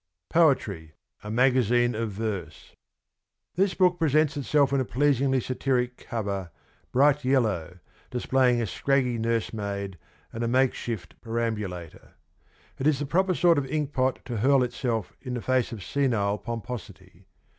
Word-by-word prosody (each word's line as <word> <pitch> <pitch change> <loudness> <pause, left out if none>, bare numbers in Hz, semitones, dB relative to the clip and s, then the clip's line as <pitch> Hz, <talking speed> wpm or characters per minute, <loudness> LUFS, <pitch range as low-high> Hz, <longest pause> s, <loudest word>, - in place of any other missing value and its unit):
POETRY: 105 - +2 0.3
A 105 - -6
MAGAZINE 120 0 +3
OF 110 0 -2
VERSE. 100 -6 -5 0.8
This 190 +1 +1
book 180 -2 +3
presents 155 -1 +2
itself 140 0 +2
in 140 - +3
a - - +2
pleasingly 135 +1 +2
satiric 125 0 -1
cover, 100 -6 -4 0.4
bright 145 +2 +4
yellow, 105 - 0 0.3
displaying 125 0 +2
a 115 - 0
scraggy 125 +2 0
nursemaid 100 -4 -2 0.3
and 115 - -3
a - - 0
makeshift 115 - -1
perambulator. 105 -8 -4 0.6
It 135 - +1
is 155 -3 +3
the 145 - -3
proper 185 +5 +1
sort 170 -3 +4
of 135 - -4
ink 150 0 -2
pot 130 0 0
to 120 -3 -4
hurl 135 +4 +4
itself 120 -4 -2
in 125 -2 -4
the - - -2
face 130 -1 +1
of 110 -5 -7
senile 110 -7 0
pomposity. 115 -2 -8
125 Hz, 140 wpm, -26 LUFS, 110-135 Hz, 0.8 s, bright